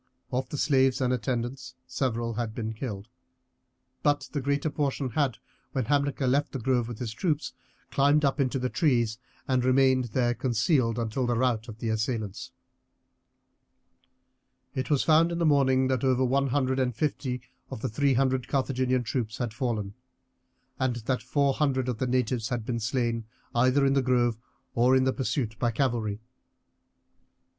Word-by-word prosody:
Of 125 0 -1
the 145 - -4
slaves 135 -3 +3
and 125 -1 +1
attendants 125 +2 -3
several 120 -3 -2
had 115 -1 -3
been 110 -1 -3
killed, 105 -3 -6 0.9
but 145 -1 +1
the 145 - -2
greater 140 +3 0
portion 140 -3 -1
had, 140 -1 0 0.4
when 130 -4 0
Hamilcar 140 +1 +1
left 140 +3 +1
the 135 - -3
grove 120 -1 +1
with 120 -2 -6
the 125 - -4
troops, 145 - -2 0.4
climbed 145 +2 +3
up 140 +2 +1
into 130 -1 0
trees, 120 -7 +1 0.3
and 130 -2 +2
remained 130 0 +4
there 120 +1 +1
concealed 120 - +1
until 120 +2 -1
the 120 - +1
rout 120 -2 +1
of 110 -2 -9
the 115 0 -3
assailants. 110 -2 -2 2.2
It 130 - -3
was 145 -3 +3
found 165 +2 +4
in 170 - -2
the 170 - +1
morning 130 -3 +4
that 130 -1 0
over 130 -1 +3
one 135 +2 +2
hundred 130 0 0
and 125 -3 0
fifty 130 -2 -2 0.3
of - - -7
the 130 - -1
three 135 +3 +1
hundred 130 -1 +1
Carthaginian 130 -2 0
troops 115 -2 -3
had 120 -4 -3
fallen, 110 -5 -2 0.9
and 130 -2 +1
that 120 +2 -2
four 140 -2 +1
hundred 130 -3 0
of 120 -3 -2
the 130 - 0
natives 125 -2 0
had 120 -3 -2
been 115 -1 -2
slain 115 -1 -1 0.3
either 130 +3 +3
in 135 - +3
the 135 - +3
grove 120 -3 +1 0.3
or 125 +2 +4
in 130 - +4
the 130 0 +2
pursuit 120 -4 -2
by 120 - +2
cavalry. 115 -4 -1
130 Hz, 165 wpm, -27 LUFS, 120-135 Hz, 2.2 s, remained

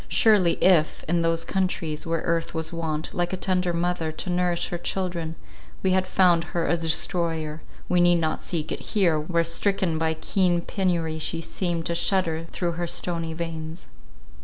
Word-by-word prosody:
Surely, 205 -7 +4
if, 170 -5 +4
in 170 +1 +2
those 165 0 +1
countries 170 -5 -2
where 165 0 0
earth 165 0 -1
was 160 +1 -3
wont, 160 -2 -3
like 175 +1 -1
a - - -1
tender 180 -1 0
mother, 170 -1 -1
to 180 +3 -4
nourish 175 -1 +1
her 175 - -3
children, 175 -4 -3 0.5
we 190 - +3
had 185 0 +2
found 175 -3 +4
her 170 - +1
a - - +3
destroyer, 165 -1 -1 0.3
we 180 -1 +3
need 175 0 +6
not 160 -2 0
seek 160 -3 -3
it - - -2 0.2
here, 170 -6 +4
where 170 +2 +1
stricken 165 0 0
by 160 0 +1
keen 175 +2 +1
penury 170 -3 -1
she 155 +1 -1
seems 165 0 -2
to 170 - 0
shudder 170 -2 +1
through 175 -2 -1
her 175 +1 -3
stony 165 -1 -2
veins. 165 0 -6
170 Hz, 175 wpm, -25 LUFS, 160-180 Hz, 0.5 s, need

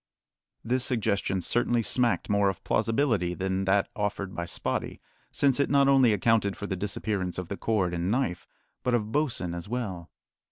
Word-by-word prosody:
This 125 +2 0
suggestion 100 -6 0
certainly 120 +5 +1
smacked 120 +1 +1
more 100 -1 +3
of 95 - -6
plausibility 115 -8 +1
than 95 +1 -1
that 95 +1 +2
offered 100 -2 -3
by 85 - -3
Spottie, 85 - -3 0.3
since 140 -2 +3
it 140 - +2
not 140 -1 +4
only 135 -4 +5
accounted 105 0 +2
for 100 - -5
the 95 - -2
disappearance 95 -2 -3
of 90 -2 -5
the 100 - -4
cord 95 -6 0
and 85 +1 -1
knife, 105 -7 -1 0.3
but 125 -1 +1
of 110 -2 -2
Bosin 125 - -1
as 85 +3 -6
well. 100 -9 -4
105 Hz, 170 wpm, -27 LUFS, 95-120 Hz, 0.3 s, only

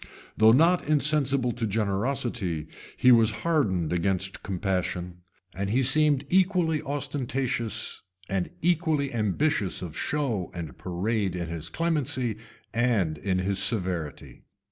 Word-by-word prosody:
Though 110 +1 +6
not 165 +8 +4
insensible 140 -4 +2
to 115 -1 -2
generosity, 105 - -1 0.3
he 125 - +6
was 115 -2 +6 0.2
hardened 95 - +1
against 95 +2 -1
compassion; 90 -2 -2 0.4
and 95 0 -3
he 130 +5 +2
seemed 145 +1 +3
equally 180 -3 +2
ostentatious 130 -5 -2 0.3
and 95 -2 -1
equally 160 -5 +1
ambitious 105 - 0
of 80 -3 -7
show 125 -12 -1
and 80 -7 -6
parade 95 +1 -2
in 85 -2 -4
his 85 -2 -5
clemency 145 -9 -1 0.4
and 110 -10 +1
in 95 +3 0
his 95 +1 0
severity. 90 - -2
115 Hz, 120 wpm, -27 LUFS, 95-140 Hz, 0.4 s, Though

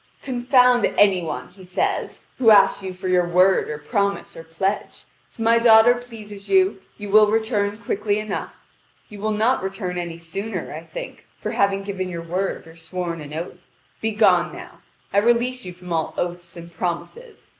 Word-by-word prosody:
"Confound 250 -1 +3
any 195 -3 +5
one," 125 -6 -5
he 190 - -16
says, 180 0 -2
"who 235 -4 +5
asks 200 -2 +6
you 190 -1 -5
for 185 0 -7
your 180 -1 +2
word 185 +2 +3
or 150 - -4
promise 200 +7 -2
or 165 - -9
pledge. 190 +5 -3 0.3
If - - -30
my 230 0 +3
daughter 230 0 +7
pleases 215 -5 -10
you, 380 0 +3 0.2
you 205 -1 -7
will 215 0 +6
return 210 -2 0
quickly 205 -1 -1
enough. 215 -1 -4 0.6
You 210 -2 -10
will 215 +2 -1
not 220 +5 +1
return 190 -2 -4
any 170 -1 -5
sooner. 195 +6 -5
I - - -6
think, - - -9
for - - -4
having 195 0 +1
given 190 -2 -4
your 170 -2 -5
word 180 +3 -3
or 165 0 -14
sworn 170 0 -5
an 145 -1 -9
oath. 175 +2 -6 0.4
Begone 220 0 +3
now. - - -11 0.3
I 200 - +5
release 240 +3 +1
you 180 - -6
from 180 -1 -8
all 160 -1 -1
oaths 175 0 -4
and 170 0 -10
promises. 315 - -5
200 Hz, 175 wpm, -22 LUFS, 180-220 Hz, 0.6 s, daughter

